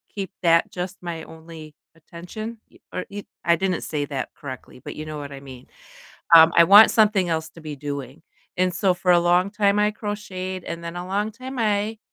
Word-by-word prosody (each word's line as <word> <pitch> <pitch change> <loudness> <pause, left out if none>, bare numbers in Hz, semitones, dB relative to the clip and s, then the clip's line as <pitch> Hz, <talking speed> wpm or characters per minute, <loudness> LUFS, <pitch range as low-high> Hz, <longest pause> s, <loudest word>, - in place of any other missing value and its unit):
keep 195 -3 -4
that 165 -1 +3
just 180 +1 -5
my 170 -2 -5
only 160 -2 -12 0.2
attention, 180 +8 -9
y - - -20 0.2
or 185 - -3
y 205 0 -7 0.2
I 170 0 +4
didn't 185 0 -1
say 145 -2 -2
that 135 -3 -4
correctly, 130 -2 -9
but - - -7
you 155 - -6
know 155 -1 -6
what 145 -1 -7
I 140 - -8
mean, 130 -2 -12 0.7
um, 160 0 +9
I 170 - +9
want 205 +5 +8
something 210 -4 +3
else 160 -1 -2
to 165 - -14
be 155 -1 -6
doing, 140 0 -6 0.4
and 185 0 +1
so, 185 +1 +2
for 180 0 +1
a 175 - +6
long 175 +2 +2
time 205 -1 +2
I 210 0 +3
crocheted, 195 -4 -5
and 170 0 -6
then 170 0 -6
a 180 - -6
long 205 +3 -1
time 255 +4 -8
I 215 0 0
175 Hz, 210 wpm, -23 LUFS, 160-200 Hz, 0.7 s, um